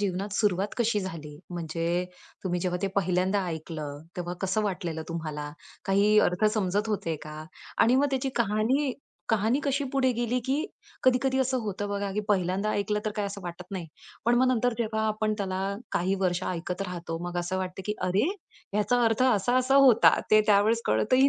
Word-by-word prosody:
जीवनात 195 0 -2
सुरुवात 205 -1 +1
कशी 230 -3 +1
झाली? 155 -6 -7
म्हणजे 170 +1 -1 0.4
तुम्ही 175 -1 -1
जेव्हा 180 0 -1
ते - - +2
पहिल्यांदा 185 +1 +1
ऐकलं 155 -3 -5 0.2
तेव्हा 175 0 -3
कसं 195 +3 0
वाटलेलं 175 -5 -3
तुम्हाला? 155 -3 -4 0.3
काही 205 +2 +4
अर्थ 180 +4 -1
समजत 205 +1 0
होते 165 -6 -1
का? 155 0 -8 0.3
आणि 240 +3 +5
मग 285 +2 +4
त्याची 265 0 0
कहाणी 235 +5 +1 0.4
कहाणी 225 +6 +2
कशी 280 0 0
पुढे 260 -1 +3
गेली 240 +1 0
की 265 - +1 0.5
कधी-कधी 260 +1 +3
असं 260 0 +1
होतं 205 -1 -3
बघा, 200 -1 -2
की 210 - 0
पहिल्यांदा 195 +1 +1
ऐकलं 210 +1 0
तर 215 - 0
काय 205 -1 0
असं 200 0 -6
वाटत 175 +1 -6
नाही. 185 -4 -4 0.4
पण 240 +1 +4
मग 255 +1 +4
नंतर 245 +1 +1
जेव्हा 220 -1 0
आपण 215 0 0
त्याला 190 -1 -2 0.3
काही 185 +3 +1
वर्ष 180 -1 +1
ऐकत 180 +2 -3
राहतो, 175 -3 -5
मग 175 - -6
असं 175 +2 -2
वाटतं 185 0 -4
की 210 - -1
"अरे, 190 +7 +2 0.5
ह्याचा 210 +4 +2
अर्थ 225 +2 +2
असा-असा 255 +3 +3
होता." 260 -5 +7
ते 215 - +7
त्यावेळेस 215 +2 +4
कळतही 255 - +4
200 Hz, 175 wpm, -27 LUFS, 180-230 Hz, 0.5 s, होता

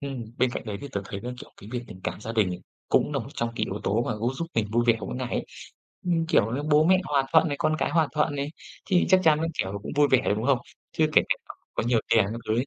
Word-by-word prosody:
ừm, 135 -4 -5
bên 130 - +3
cạnh - - -4
đấy 105 -2 -3
thì 140 - -7
tớ 100 - -1
thấy 100 0 -6
là, 125 - -4
kiểu, - - -11
cái 100 - -11
việc 125 - -1
tình 95 -3 -11
cảm - - -3
gia 110 - -5
đình 110 -5 +2
này, 90 - -4 0.3
cũng - - +2
là - - 0
một - - -6
trong 115 - -1
cái - - +1
yếu 100 +2 -5
tố 105 +4 +1
mà - - 0
cũng 120 +4 -1
giúp 170 - -3
mình 115 -2 +1
vui 120 +1 +3
vẻ 120 -1 +5
mỗi 95 - -5
ngày 125 -1 -3
ấy. - - -2 0.6
Ừm, 165 -2 +1
kiểu 110 -8 +3
như, 145 - -2
bố 150 0 +4
mẹ 185 +2 +5
hòa 145 -4 +1
thuận 160 0 +5
này, 145 - -2
con 155 - +2
cái - - 0
hòa 160 -3 +2
thuận 150 -1 +1
này, 140 +1 -2 0.4
thì 180 -3 +3
chắc 185 0 +6
chắn 155 -2 +5
nó 165 - 0
kiểu 95 +2 -1
cũng - - -6
vui 145 0 +5
vẻ, 130 -1 +5
đúng 110 - -3
hông? 135 -1 +3 0.3
Chưa 155 - +3
kể - - +6
kể - - +3
cả - - -8 0.2
có - - 0
nhiều 120 -2 +3
tiền 110 -2 +5
các 115 - -5
thứ 110 - +2
ấy, 125 - 0
125 Hz, 310 wpm, -26 LUFS, 110-150 Hz, 0.6 s, chắc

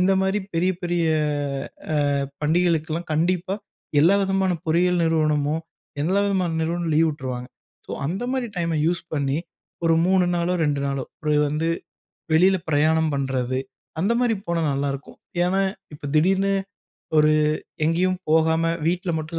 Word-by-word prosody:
இந்த 185 +2 +4
மாரி 190 +2 +1
பெரிய 180 +3 +2
பெரிய 175 -1 0 1.1
அ - - +1 0.3
பண்டிகைகளுக்கெல்லாம் 165 +1 +1
கண்டிப்பா 180 +4 0 0.5
எல்லா 180 +5 +5
விதமான 190 -1 +1
பொறியியல் 175 +2 +2
நிறுவனமும், 155 -1 +1 0.4
எல்லா 190 +5 +2
விதமான 190 -3 +1
நிறுவனமும் 170 0 -1
லீவ் 165 0 +4
விட்ருவாங்க 125 -4 -5 0.4
ஸோ, - - -5
அந்த 190 +9 -2
மாரி 260 -2 -1
டைம் 170 -1 0
யூஸ் 175 0 0
பண்ணி 140 -1 0 0.5
ஒரு 165 0 +4
3 185 -1 +4
நாளோ, 175 +1 0
2 145 -2 0
நாளோ 140 -1 -2 0.2
ஒரு 150 - +2 0.2
வந்து 155 +3 -1 0.7
வெளில 185 +3 +5
பிரயாணம் 155 +1 +3
பண்றது, 130 -2 -1 0.4
அந்த 200 +7 +2
மாரி 235 -3 +2
போனா 170 -1 0
நல்லாருக்கும். 140 0 -3 0.3
ஏன்னா 190 +2 +1 0.3
இப்போ 145 - -9
திடீர்னு 195 +4 +3 0.6
ஒரு 155 0 +5 0.5
எங்கேயும் 180 +4 +2
போகாம 160 +1 +3 0.2
வீட்ல 175 +2 0
மட்டும் 160 +2 -4
165 Hz, 135 wpm, -23 LUFS, 155-185 Hz, 1.1 s, எல்லா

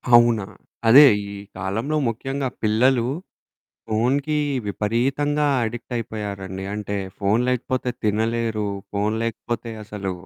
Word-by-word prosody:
అవునా. 120 -3 +5 0.4
అదే 135 +6 +10 0.2
ఈ - - -7 0.3
కాలంలో 105 +11 -2
ముఖ్యంగా 135 +4 -2
పిల్లలు 120 +3 +3 0.8
ఫోనుకి 135 +7 +1 0.3
విపరీతంగా 135 +9 0 0.2
అడిక్ట్ 120 +2 -5
అయిపోయారండి. 100 -4 -5
అంటే 105 -1 -3 0.2
ఫోను 105 +4 +2
లేకపోతే 125 0 0
తినలేరు. 110 0 0 0.2
ఫోను 105 +2 0
లేకపోతే 115 +1 -3
అసలు 100 -3 -4
115 Hz, 100 wpm, -23 LUFS, 105-125 Hz, 0.8 s, అదే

